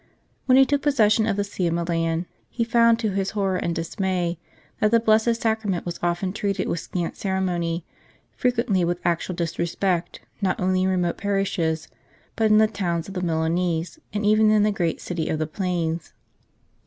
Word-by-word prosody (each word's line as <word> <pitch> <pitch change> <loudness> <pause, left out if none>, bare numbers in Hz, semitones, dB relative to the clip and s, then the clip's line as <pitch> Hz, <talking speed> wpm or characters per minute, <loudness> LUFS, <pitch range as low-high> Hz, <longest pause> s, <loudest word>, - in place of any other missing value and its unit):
When 255 0 +6
he 270 - +7
took 285 +1 0
possession 225 -7 +3
of 215 - +1
the 205 - +1
See 195 -3 -2
of 170 - 0
Milan, 165 0 -1 0.2
he 235 - -1
found 230 0 +4
to 220 -3 -1
his 195 0 -1
horror 195 -2 +1
and 170 -2 -2
dismay 175 0 -2 0.4
that 215 - +3
the 230 +1 +4
Blessed 220 +1 +3
Sacrament 220 -5 -1
was 175 0 -5
often 175 +2 -1
treated 200 -2 -1
with 170 - -1
scant 175 0 -4
ceremony, 180 -4 -1 0.5
frequently 235 -7 +1
with 175 +1 0
actual 175 +1 0
disrespect, 170 +1 -1 0.2
not 190 -2 0
only 185 0 +1
in - - +2
remote 180 -2 0
parishes, 175 -5 -1 0.5
but 220 -1 +2
in 215 - +6
the 220 - +6
towns 180 -5 -2
of - - -7
the 180 - -3
Milanese 165 - -1
and 210 0 -2
even 215 +1 +5
in 215 -1 +4
the 210 - +3
great 175 -5 -1
City 170 -3 -3
of 155 - 0
the 155 - -1
Plains. 170 -1 -2
185 Hz, 180 wpm, -24 LUFS, 170-215 Hz, 0.5 s, he